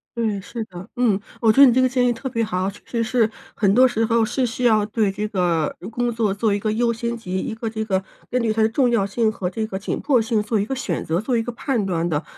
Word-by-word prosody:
对， 220 -4 -1
是 230 +4 -5
的， 185 0 -10
嗯， 225 -5 +2 0.2
我 225 -2 +5
觉 275 - +5
得 275 - +10
你 240 - +4
这 260 - +3
个 255 - +4
建 250 -1 +2
议 240 - +2
特 250 +3 -5
别 230 -2 -1
好。 185 -2 -1
确 200 - -12
实 230 -2 -1
是， 225 -1 +1 0.2
很 200 -2 +2
多 255 +2 +6
时 225 -2 0
候 230 0 +2
是 255 +3 0
需 235 +2 -4
要 215 -3 +4
对 215 -2 +1
这 210 +2 -3
个 175 -7 0
如 190 - -8
工 240 +1 -1
作 220 -4 0
做 210 +1 +1
一 200 - 0
个 215 +1 -1
优 235 +1 +1
先 235 +1 -3
级， 185 -4 -4
一 - - -3
个 225 0 -4
这 220 0 -3
个 190 -2 0 0.3
根 250 - 0
据 225 -2 +1
它 220 - 0
的 220 - +4
重 250 +2 +2
要 230 -5 +2
性 220 +2 +1
和 180 -4 -3
这 220 +4 -3
个 190 - -4
紧 200 - -3
迫 260 -6 +2
性 220 -1 0
做 215 0 0
一 200 - 0
个 270 - -3
选 195 -10 -3
择， 165 +3 0
做 240 +1 0
一 225 - 0
个 245 - -4
判 235 -3 -1
断 170 -2 -1
的。 155 -1 -1
220 Hz, 315 characters per minute, -22 LUFS, 200-235 Hz, 0.3 s, 得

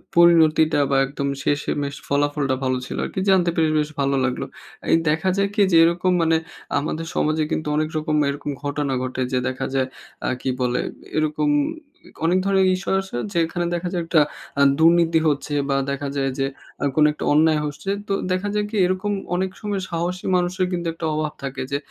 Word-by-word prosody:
পরিণতিটা 160 -3 +5
বা 135 - +3
একদম 140 +1 -4 0.2
শেষেমেশ 145 -1 -1
ফলাফলটা 145 -1 +1
ভালো 130 -1 +1
ছিল - - -6
আরকি, - - -4
জানতে 185 -3 +4
পেরে 160 -2 +2
বেশ 150 0 -1
ভালো 140 0 +1
লাগলো। 130 - -2 0.5
এই - - +6
দেখা 160 +5 +1
যায় 200 0 +2
কি 210 - +2
যে - - +4
এরকম 175 +2 +2
মানে 165 0 +3 0.4
আমাদের 155 +3 -3
সমাজে 155 +1 +1
কিন্তু 155 - -2
অনেক 155 0 0
রকম 155 0 -1
এরকম 145 +1 -4
ঘটনা 145 -1 -1
ঘটে; 130 0 -3
যে 130 - +1
দেখা 130 0 -3
যায় 130 -1 +1 0.4
অ্যা - - 0
কী - - -1
বলে, 125 0 +1 0.4
এরকম 155 - +1 0.8
অনেক 175 +3 +3
ধরনের 195 -1 +3
ইস্যু 185 - -5
আসে 190 -10 -7 0.2
যেখানে 170 0 0
দেখা 175 +1 -3
যায়, 175 -2 -1
একটা 165 -2 +4 0.3
অ্যা 140 - +3 0.2
দুর্নীতি 165 0 +5
হচ্ছে 145 0 -1 0.2
বা 135 - +2 0.2
দেখা 140 +1 -3
যায় 135 -1 0
যে 135 - +2 0.4
আ - - -1
কোনো 150 -1 +5
একটা - - -5
অন্যায় 155 +1 +4
হচ্ছে। 150 +6 -5 0.2
তো 200 - 0 0.2
দেখা 185 +2 0
যায় 210 0 +1
কি 220 - -6
এরকম 185 +3 -1 0.2
অনেক 190 +1 0
সময় 205 -2 -2
সাহসী 175 +2 -3
মানুষের 180 +1 0
কিন্তু 175 -1 -2
একটা 165 0 -5
অভাব 155 0 -2
থাকে 135 -1 -4
যে, 140 - +1
155 Hz, 190 wpm, -22 LUFS, 145-175 Hz, 0.8 s, এই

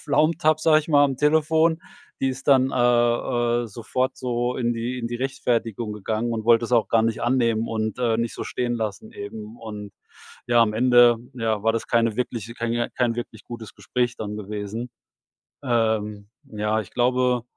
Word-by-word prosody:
pflaumt 160 +1 +1
habe, 155 0 +4
sage 155 -1 +5
ich 155 - -13
mal, 145 -2 +5
am 135 -2 0
Telefon. 160 +3 +2 0.4
Die 135 - +2
ist 135 +1 -6
dann, 135 -1 +5
äh, - - -2 0.9
äh, - - -6
sofort 125 +5 -2
so 120 0 -2
in 120 -1 0
die 120 +2 -3
in 115 - -3
die 120 - -5
Rechtfertigung 120 -4 -2
gegangen 110 +3 -2
und 110 -1 -3
wollte's 115 +1 +3
auch 115 -5 +3
gar 115 -1 +3
nicht 115 0 -1
annehmen 115 -2 +1
und, 110 -1 -2
äh, 120 -3 +1
nicht 115 0 -2
so - - -5
stehen 120 -1 -2
lassen 110 -2 -4
eben 105 +2 -8
und 105 -3 -8 0.5
ja, 120 -1 +4
am 110 -2 +3
Ende 120 0 +6 0.2
ja, 110 -4 -1
war 115 - +3
das 115 - -3
keine 115 -2 +1
wirkliche 115 -2 -3
kein 115 0 -2
J 120 0 -1
kein 120 -2 +1
wirklich 120 0 -7
gutes 115 -2 -9
Gespräch 125 -1 -2
dann 105 -1 -5
gewesen. 105 +3 -5 0.7
Ähm, 110 -4 0 0.2
ja, 105 +1 -1
ich 100 - -9
glaube 125 0 +1
120 Hz, 185 wpm, -24 LUFS, 110-125 Hz, 0.9 s, Ende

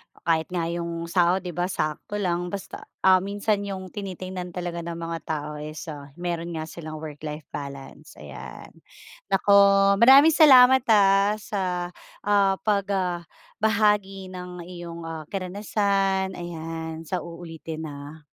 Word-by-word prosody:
o - - -24
kahit 160 0 +1
nga 180 -2 -2
yung 170 0 -4
sahod 180 +1 +3
di 180 - -4
ba 175 +2 -1
sakto 155 +2 -3
lang 180 -3 -1
basta 195 +1 -7 0.2
ah, 185 -1 +6
minsan 200 +1 -1
yung 190 -2 -6
tinitingnan 185 -2 -6
talaga 175 -1 -4
ng 170 0 -5
mga 165 0 -4
tao 150 -1 -3
is 155 +1 -7
ah, 145 -1 -9
meron 170 -1 -4
nga 160 - -3
silang 155 -1 -8
work-life 150 0 -7
balance, 140 -2 -8
ayan. - - -10 0.6
Naku 195 +1 +1 0.5
maraming 275 +6 +8
salamat, 265 -4 +7
ah, 200 -1 +5
sa, 210 -2 -4 0.6
ah, 200 -1 +3
pag 200 -2 +1
ah, 180 -2 -1 0.4
bahagi 205 -3 +1
ng 180 -1 -8
iyong, 170 -1 -8
ah, 160 -2 -7
karanasan, 195 0 0
ayan 165 -1 -6
sa 180 +3 -3
uulitin 165 -1 -8
ha. 145 +2 -10
180 Hz, 140 wpm, -25 LUFS, 165-195 Hz, 0.6 s, maraming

